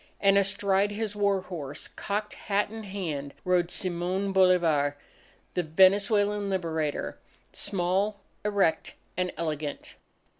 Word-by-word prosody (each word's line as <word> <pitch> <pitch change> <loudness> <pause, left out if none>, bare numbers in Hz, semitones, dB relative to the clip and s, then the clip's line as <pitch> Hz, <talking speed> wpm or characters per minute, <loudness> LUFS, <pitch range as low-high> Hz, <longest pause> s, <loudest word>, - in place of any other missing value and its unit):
And 195 -1 +4
astride 200 0 +2
his 210 0 -3
war 200 -2 +2
horse, 150 -7 -6
cocked 210 +1 -3
hat 205 0 -1
in 220 -1 -7
hand, 160 -8 -4
rode 180 -1 +2
Simon 185 +2 -2
Bolivar, 170 -7 +3 0.6
the 180 - +1
Venezuelan 200 +4 +3
Liberator, 160 -5 -2 0.3
small, 195 +2 -1 0.2
erect, 200 -5 +1 0.2
and 180 0 -1
elegant. 150 -3 -4
190 Hz, 110 wpm, -28 LUFS, 170-200 Hz, 0.6 s, And